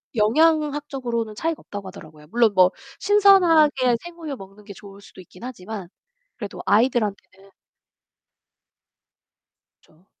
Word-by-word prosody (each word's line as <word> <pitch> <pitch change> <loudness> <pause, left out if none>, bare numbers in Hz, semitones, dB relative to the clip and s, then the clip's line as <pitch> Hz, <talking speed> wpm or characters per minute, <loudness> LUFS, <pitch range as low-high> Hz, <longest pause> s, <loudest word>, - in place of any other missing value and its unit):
영양학적으로는 275 -3 0
차이가 325 +6 -3
없다고 200 -2 -9
하더라고요, 155 -5 -13
물론 225 +3 +2
뭐 185 0 +5 0.3
신선하게 330 - +4
생우유 335 -4 -8
먹는 195 +2 -14
게 200 -1 -11
좋을 200 0 -14
수도 200 - -16
있긴 180 +2 -15
하지만 215 -6 -8 0.5
그래도 205 -4 -7
아이들한테는 210 -4 0 2.3
그쵸. 160 +4 -28
225 Hz, 300 characters per minute, -22 LUFS, 195-295 Hz, 2.3 s, 뭐